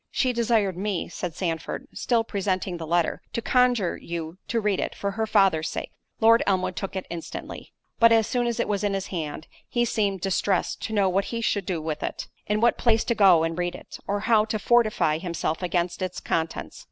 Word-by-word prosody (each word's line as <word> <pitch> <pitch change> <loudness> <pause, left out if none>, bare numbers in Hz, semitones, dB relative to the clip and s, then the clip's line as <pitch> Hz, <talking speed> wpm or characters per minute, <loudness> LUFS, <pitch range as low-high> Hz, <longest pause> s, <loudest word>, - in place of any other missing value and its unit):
"She 255 -2 +1
desired 225 -5 +1
me," 200 -3 -2
said 175 -1 -5
Sandford, 175 - -3
(still 235 -2 +1
presenting 190 -4 -2
the 165 -1 -6
letter) 170 0 +1
"to 235 - -1
conjure 245 -7 +2
you 170 +1 -6
to 230 - 0
read 205 -3 0
it, - - -2
for 200 - -2
her 220 +2 -2
father's 190 -7 +3
sake." - - -5 0.3
Lord 230 +1 +6
Elmwood 185 -2 +1
took 195 -1 -5
it 190 - -3
instantly. 170 -1 -7 0.3
But 230 0 +7
as 225 -1 +5
soon 245 +1 0
as 235 0 -2
it - - +1
was 205 -1 -1
in 200 -1 +1
his 195 -1 -2
hand, 155 -2 -4 0.2
he 240 -1 +1
seemed 200 -5 0
distressed 195 0 0
to 220 - -4
know 200 -2 +3
what 190 +2 +1
he 230 - -3
should 205 -4 -1
do 180 -3 -1
with 155 -1 -3
it—in 210 +1 -4
what 235 - +3
place 225 -2 +3
to 235 - 0
go 190 -7 +6
and 165 0 -1
read 175 0 -1
it—or 205 +1 -5
how 220 -1 +4
to 220 0 -2
fortify 215 -9 +2
himself 170 -2 -2
against 175 0 -1
its 185 -1 -3
contents. 165 0 -3
195 Hz, 205 wpm, -25 LUFS, 175-225 Hz, 0.3 s, But